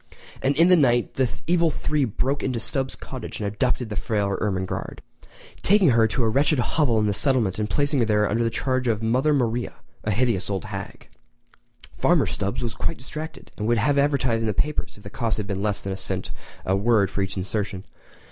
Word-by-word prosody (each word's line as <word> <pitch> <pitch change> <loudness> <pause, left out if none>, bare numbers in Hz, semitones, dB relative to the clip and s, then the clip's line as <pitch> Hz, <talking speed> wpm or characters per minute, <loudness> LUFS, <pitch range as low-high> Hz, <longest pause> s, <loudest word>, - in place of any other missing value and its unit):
And 135 +2 +1
in 165 +4 +5
the 180 - +8
night 120 -7 +3
the 130 -2 +1 0.2
evil 170 0 +3
three 150 -2 0
broke 130 +5 -1
into 130 -2 -1
the - - -3
Stubbs 135 0 -1
cottage 130 - -7
and 105 - -3
abducted 115 +3 0
the 105 - -4
fair 100 -1 0
Ermengarde, 95 -3 -2 0.6
taking 195 -3 +5
her 115 -1 +4
to 120 +3 -1
a - - +3
wretched 140 +6 +2
hovel 125 0 +2
in 105 - +2
the 105 - +1
settlement 115 -5 +1
and 105 0 -1
placing 145 -5 +1
her 105 -1 +3
under 115 +3 +1
the 115 - +1
charge 130 +1 -1
of 110 -1 0
Mother 130 +7 +2
Maria, 120 -4 0 0.3
a - - -2
hideous 105 -3 +1
old 95 -3 -2
hag. - - -7 0.9
Farmer - - +4
Stubbs 100 +5 -2
was 115 - -2
quite 165 - -2
distracted, 155 +4 -8
and 105 - -2
would 120 0 +3
have 140 +6 +2
advertised 135 -5 +2
in 115 - -1
the 105 - -1
papers 150 -2 -1
if 105 - -16
the 100 - -9
cost 115 -2 -1
had 105 - -3
been 100 -1 -3
less 105 -1 -1
than 95 - -3
a - - -5
cent 95 - -4 0.3
a 95 - +2
word 100 -1 +2
for 100 - -2
each 95 0 -3
insertion. 95 0 -3
115 Hz, 215 wpm, -24 LUFS, 105-135 Hz, 0.9 s, the